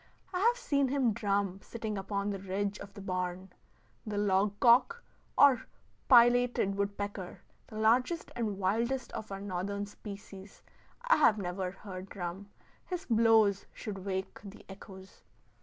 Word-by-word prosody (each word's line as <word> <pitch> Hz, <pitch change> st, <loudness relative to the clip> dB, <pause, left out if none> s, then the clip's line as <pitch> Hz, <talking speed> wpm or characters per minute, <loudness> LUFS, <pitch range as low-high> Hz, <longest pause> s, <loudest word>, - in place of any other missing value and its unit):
I 360 Hz, -, -1 dB
have 470 Hz, +5 st, +3 dB
seen 280 Hz, -, +1 dB
him 260 Hz, -4 st, +1 dB
drum 200 Hz, -2 st, -1 dB
sitting 220 Hz, -2 st, -5 dB
upon 200 Hz, +1 st, -2 dB
the 195 Hz, -, -4 dB
ridge 195 Hz, +2 st, -3 dB
of 200 Hz, -, -9 dB
the 200 Hz, -, -8 dB
barn. 185 Hz, 0 st, -4 dB, 0.5 s
The 215 Hz, -3 st, -4 dB
log 205 Hz, 0 st, +1 dB
cock, 260 Hz, -, +4 dB, 0.3 s
or 270 Hz, -4 st, +5 dB, 0.4 s
pileated 240 Hz, -4 st, +5 dB
woodpecker, 200 Hz, -1 st, -4 dB, 0.3 s
the -, -, -12 dB
largest 250 Hz, +10 st, +2 dB
and 215 Hz, -4 st, -2 dB
wildest 230 Hz, +7 st, -1 dB
of 215 Hz, -, -7 dB
our 195 Hz, -, -4 dB
Northern 200 Hz, +1 st, -3 dB
species, 200 Hz, -1 st, -11 dB, 0.4 s
I -, -, +4 dB
have 215 Hz, -, +5 dB
never 185 Hz, -1 st, -3 dB
heard 190 Hz, 0 st, -9 dB
drum. 190 Hz, +2 st, -6 dB, 0.4 s
His 365 Hz, 0 st, -4 dB
blows 220 Hz, -3 st, +4 dB
should 195 Hz, -5 st, -6 dB
wake 190 Hz, -1 st, -4 dB
the 200 Hz, 0 st, -11 dB
echoes. 190 Hz, -1 st, -12 dB
205 Hz, 140 wpm, -31 LUFS, 195-235 Hz, 0.5 s, or